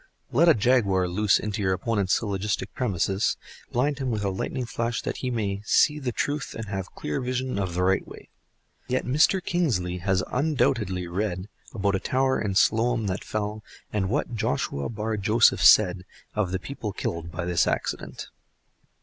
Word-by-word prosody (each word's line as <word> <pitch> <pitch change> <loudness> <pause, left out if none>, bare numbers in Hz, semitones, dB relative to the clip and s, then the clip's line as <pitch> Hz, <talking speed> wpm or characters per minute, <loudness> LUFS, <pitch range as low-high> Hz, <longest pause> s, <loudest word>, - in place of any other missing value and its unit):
Let 165 +7 +5
a 160 - +6
jaguar 100 -5 +2
loose 100 +3 +3
into 105 0 -3
your 95 -1 +2
opponent's 100 -1 +1
syllogistic 105 -1 -2
premises, 100 -3 0 0.3
blind 140 +4 0
him 135 -2 -2
with 110 -3 -1
a 100 - +1
lightning 120 +6 -3
flash 115 0 -2
that - - -3
he 130 - -3
may 100 -5 -2
see 150 +6 +3
the 130 -4 -2
truth 145 +4 -2
and 110 - -5
have 95 -2 -5
clear 75 - -3
vision 130 -2 -2
of 95 -3 -2
the 90 - +1
right 95 +1 +2
way. - - -12 0.6
Yet 130 +1 -1
Mr. 155 +8 +3
Kingsley 105 - 0
has 95 +1 +1
undoubtedly 125 - +1
read 95 +2 -3 0.2
about 100 -3 0
a 95 - +1
tower 130 +4 +1
in 100 -3 -2
Siloam 115 +2 +3
that 95 -1 -2
fell, 105 0 -3 0.3
and 95 -3 0
what 130 +1 -1
Joshua 70 -9 -1
Bar 110 -1 -3
Joseph 110 +3 +4
said 90 -3 +6 0.3
of 105 -4 0
the 95 - 0
people 110 -3 -6
killed 85 -1 -4
by 85 +1 -4
this 90 -1 +2
accident. - - -3
105 Hz, 175 wpm, -26 LUFS, 95-125 Hz, 0.6 s, a